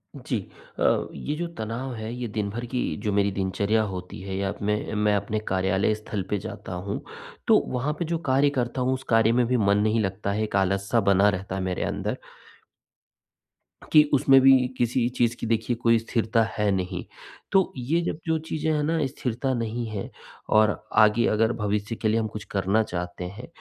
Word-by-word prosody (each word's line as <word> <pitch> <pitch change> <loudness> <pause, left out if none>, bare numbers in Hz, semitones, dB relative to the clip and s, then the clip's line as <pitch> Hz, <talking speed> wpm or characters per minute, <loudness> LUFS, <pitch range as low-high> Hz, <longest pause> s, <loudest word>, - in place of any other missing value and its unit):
जी। - - -3 0.4
अ, - - +2
ये 150 - -4
जो 170 +2 -3
तनाव 115 +4 -4
है 110 +1 -5
ये 125 -1 -4
दिन 105 -1 -2
भर 120 +4 -5
की 125 - +1 0.3
जो 105 - +1
मेरी 100 0 +2
दिनचर्या 100 +3 0
होती 90 -4 -6
है 95 0 -5
या 100 0 -1
मैं 105 +1 -1
मैं 105 0 +2
अपने 105 +2 -1
कार्यालय 95 +2 +1
स्थल 105 -2 -5
पर 105 - +1
जाता 90 - -7
हूँ। 100 - -3 0.5
तो - - +7 0.2
वहाँ 135 +5 0
पे 170 - -1
जो 165 +1 -1
कार्य 140 +2 +4
करता 120 +2 -2
हूँ 130 +1 +2
उस 130 0 -4
कार्य 115 0 +4
में - - +2
भी 125 0 +2
मन 100 -1 +3
नहीं 110 +2 +2
लगता 95 0 -2
है। 110 +2 0
एक 105 - -3
आलस 95 +1 +1
सा 115 - +4
बना 100 +2 +5
रहता 95 0 -3
है 95 - -2
मेरे 95 -1 -2
अंदर। - - -2 1.7
कि 150 -1 +8
उसमें 135 0 +6
भी 135 0 +7 0.3
किसी 120 0 +1
चीज़ 120 0 +2
की 115 - -3
देखिए 115 +1 0
कोई 115 0 +5
स्थिरता 115 0 +1
है 105 -1 +2
नहीं। 95 -1 -2 0.5
तो 190 -1 +3
ये 150 +8 0
जब 170 - -3
जो 160 0 +2
चीज़ें 160 0 -1
हैं 150 - 0
ना 160 +2 +1
स्थिरता 130 0 -2
नहीं 115 0 -2
है, 105 -3 -5 0.4
और 110 0 +4 0.2
आगे 110 +2 +5
अगर 110 +2 +2
भविष्य 105 +2 -1
के 110 - -2
लिए 110 +1 +2
हम 110 - -1
कुछ 105 -2 -7
करना 100 +3 +2
चाहते 90 -2 -5
हैं 120 - -9
110 Hz, 200 wpm, -25 LUFS, 100-120 Hz, 1.7 s, कि